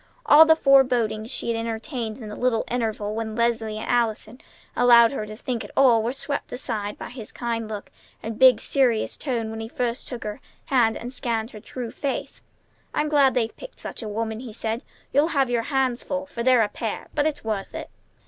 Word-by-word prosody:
All 320 -6 +8
the 320 - +7
forebodings 250 -7 +3
she 250 - -4
had 225 - -2
entertained 225 0 -4
in 220 -5 -8
the 210 - -6
little 245 -3 +1
intervals 220 -3 -1
when 220 -1 -3
Leslie 230 -2 0
and 215 - -5
Allison 235 0 0 0.3
allowed 235 -1 +7
her 215 -6 -4
to 215 - -8
think 240 0 -3
at - - -9
all 245 -5 +6
were 230 +2 -1
swept 280 +2 -4
aside 215 -5 -3
by - - -7
his 245 -4 -8
kind 230 -2 -3
look 210 -2 -6 0.3
and 225 0 -5
big, 255 -4 +7
serious 245 -5 +1
tone 235 -6 -2
when 220 - -6
he 225 - -5
first 240 +1 -3
took 245 -3 -6
her 210 -1 -5 0.2
hand 235 -4 +3
and 245 +2 -7
scanned 230 -3 -2
her 215 - -9
true 240 +2 -6
face. 275 -2 -4 0.5
"I'm 300 0 +1
glad 280 -3 +4
they've 230 -3 0
picked - - -11
such - - -7
a 220 - -5
woman!" 220 +1 -3
he 240 -3 -8
said. 225 +2 -3 0.3
"You'll 290 +3 +4
have 265 -3 +3
your 235 -1 +2
hands 265 -3 +1
full, 280 0 -3
for 260 -4 -6
they're 250 -1 +5
a - - +1
pair! - - -5
But 290 - +2
it's 300 -2 -3
worth 215 -3 -3
it!" - - -6
235 Hz, 210 wpm, -24 LUFS, 220-260 Hz, 0.5 s, All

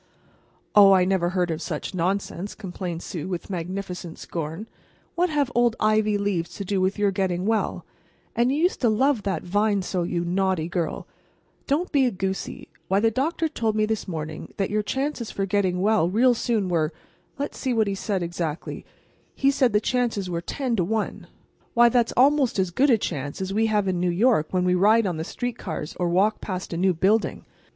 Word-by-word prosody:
"Oh, 200 -1 +8
I 185 -1 +4
never 185 -2 +1
heard 180 -2 0
of 160 0 -3
such 160 +1 -4
nonsense," 190 +2 -2
complained 180 -4 -5
Sue, 170 -5 -5
with 185 +1 -5
magnificent 180 -1 -5
scorn. 165 +5 -5 0.5
"What 355 +1 +1
have 290 -4 0
old 240 -1 +3
ivy 215 -1 +2
leaves 180 -4 -2
to 200 - -5
do 195 0 0
with 190 +3 +1
your 205 -1 +2
getting 185 -2 -1
well? 220 0 0 0.5
And 240 +2 +3
you 280 - 0
used 360 - +1
to 240 - +4
love 255 +2 +2
that 195 -1 -2
vine 205 +2 +1
so, 180 0 -2
you 170 0 -1
naughty 185 -2 0
girl. 170 -2 -3 0.6
Don't 310 +6 0
be 275 -4 +4
a - - 0
goosey. 190 0 -4 0.2
Why, 190 +1 +2
the 225 +1 +3
doctor 315 +7 0
told 225 -8 -1
me 215 0 +2
this 220 0 -2
morning 155 -3 -5
that 195 -1 -1
your 215 0 +1
chances 265 +1 -2
for 195 - -2
getting 185 -2 0
well 205 -4 +3
real 245 +6 +4
soon 225 -4 0
were—let's 170 - -4
see 265 - -2
exactly 190 -7 -1
what - - -11 0.5
he - - -4
said—he 275 - +7
said 265 -3 +2
the 210 - +3
chances 220 -5 -1
were 170 -1 -2
ten 250 +6 -2
to 180 - +2
one! 215 +4 -2 0.5
Why, 240 0 +7
that's 235 -1 +2
almost 275 -1 +4
as 185 -2 +1
good 270 +11 +3
a 235 - +5
chance 145 -8 -4
as 190 0 -3
we 220 +2 +2
have 210 -2 +1
in 185 -2 0
New 180 0 +1
York 180 -3 +3
when 180 -1 0
we 180 - +3
ride 210 +5 +4
on 180 -4 -1
the 160 - -3
street 245 +7 -4
cars 155 -4 -5
or 175 -1 +1
walk 200 +5 +2
past 185 -3 -5
a - - -2
new 185 0 +2
building. 205 +6 +1
195 Hz, 200 wpm, -24 LUFS, 180-225 Hz, 0.6 s, Oh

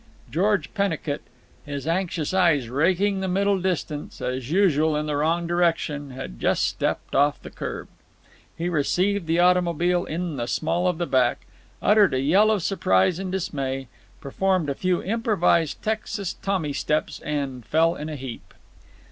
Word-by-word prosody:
George 190 - +1
Pennicut, 195 -8 -1 0.4
his 145 0 -6
anxious 170 -2 -1
eyes 165 -10 +3
raking 185 +8 +2
the 190 - -2
middle 195 +1 +1
distance—as 145 -7 -3
usual, 160 -4 +3
in 150 0 -1
the 150 -1 -2
wrong 165 +4 +1
direction—had 145 - -1
just - - +1
stepped - - -2
off 145 +1 +3
the - - -11
kerb. - - -6 0.7
He 170 +2 -2
received 180 +4 0
the 165 +1 +1
automobile 175 0 +3
in 165 -1 -3
the 120 -1 -2
small 170 +6 0
of 180 -2 0
the 175 - -1
back, 130 -5 +1 0.4
uttered 205 -6 +5
a - - +1
yell 185 +11 +4
of 210 -5 +1
surprise 165 - +2
and 190 -1 -4
dismay, 135 -8 -3 0.3
performed 180 +1 0
a - - 0
few 180 +4 0
improvised 195 - +1
Texas 215 -3 -2
Tommy 185 -7 -2
steps, 150 +2 -1
and 140 -4 -3
fell 165 +7 +2
in 150 -1 -6
a 155 - -4
heap. 130 -4 -8
165 Hz, 150 wpm, -24 LUFS, 145-185 Hz, 0.7 s, uttered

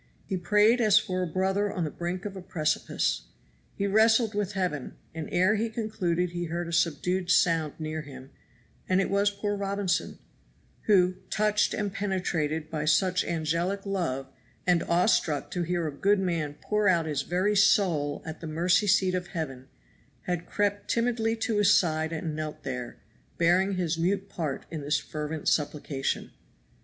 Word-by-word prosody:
He 195 - -3
prayed 210 +6 +3
as 215 -3 +5
for 185 -4 0
a 180 - -1
brother 190 +4 0
on 180 - -2
the 155 - -2
brink 175 +4 -4
of 200 -1 -5
a 190 - -7
precipice. 150 - -1 0.5
He 200 - -1
wrestled 220 +2 +4
with 205 -1 -2
Heaven; 180 -8 -2 0.2
and 160 -2 -5
ere 185 +5 +3
he 225 +2 -1
concluded 185 -6 -1
he 175 0 -3
heard 170 +1 -3
a 170 - -6
subdued 175 +2 0
sound 165 -4 +3
near 155 0 -4
him, 135 -2 -11 0.6
and 185 0 +3
it 195 - 0
was 200 +1 +3
poor 205 +1 -3
Robinson, 200 -2 -1 0.7
who, 185 -3 +4
touched 210 0 +1
and 205 -2 -2
penetrated 165 -6 -2
by 155 -1 -2
such 185 +3 +3
angelic 170 +5 -1
love, 170 -9 -2 0.4
and 175 -2 +3
awestruck 170 -3 +1
to 180 - -2
hear 175 -1 -1
a - - -3
good 200 +7 +2
man 165 -6 -1
pour 210 -1 +1
out 170 -4 +3
his 150 -3 -1
very 185 +7 0
soul 175 -8 +3
at 160 - -7
the 165 - -5
mercy 175 +6 +2
seat 190 -1 +3
of 180 -1 -2
Heaven, 135 -8 -5 0.5
had 175 +2 -3
crept 205 0 -1
timidly 230 -1 +1
to 225 -1 -1
his 205 +1 +5
side 160 -2 +1
and 160 -1 -3
knelt 155 0 -5
there, 125 -2 -5 0.4
bearing 185 +4 +3
his 170 -3 -1
mute 195 +3 0
part 155 -8 -4
in 160 -3 -4
this 145 +2 +1
fervent 155 0 -5
supplication. 145 -2 -1
180 Hz, 170 wpm, -28 LUFS, 160-200 Hz, 0.7 s, as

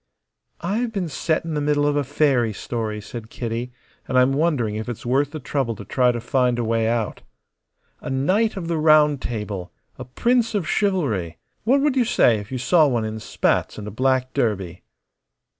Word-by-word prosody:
"I've 220 +7 -1
been 190 -6 -3
set 160 +3 -1
in 165 - -3
the 150 - -1
middle 145 0 +1
of 145 0 +1
a 145 - +1
fairy 135 -5 +1
story," 110 0 -4
said 110 +1 -8
Kitty, 120 +1 -4 0.4
"and 130 - 0
I'm 130 +1 +4
wondering 140 -8 +1
if 110 +2 -4
it's 120 - -6
worth 135 +4 +2
the 155 - -7
trouble 130 -4 -2
to - - -10
try 125 -1 +2
to 120 - -3
find 125 +1 +1
a 120 - -1
way 115 0 +1
out. 115 -2 -1 0.8
A - - -7
Knight 190 +12 +1
of 170 -3 -4
the 165 -2 -1
Round 150 -2 +5
Table, 105 -6 -4 0.3
a 130 - -6
prince 230 - +1
of 185 -6 -1
chivalry. 130 - 0 0.3
What 270 +4 +4
would 290 -2 +2
you 250 -2 +3
say 120 - +3
if 105 +3 -10
you 130 - -2
saw 155 +5 +4
one 120 -5 0
in 110 0 -4
spats - - 0
and 105 -1 -7
a - - -5
black 130 +3 0
derby?" 100 -9 -1
130 Hz, 195 wpm, -22 LUFS, 115-155 Hz, 0.8 s, Round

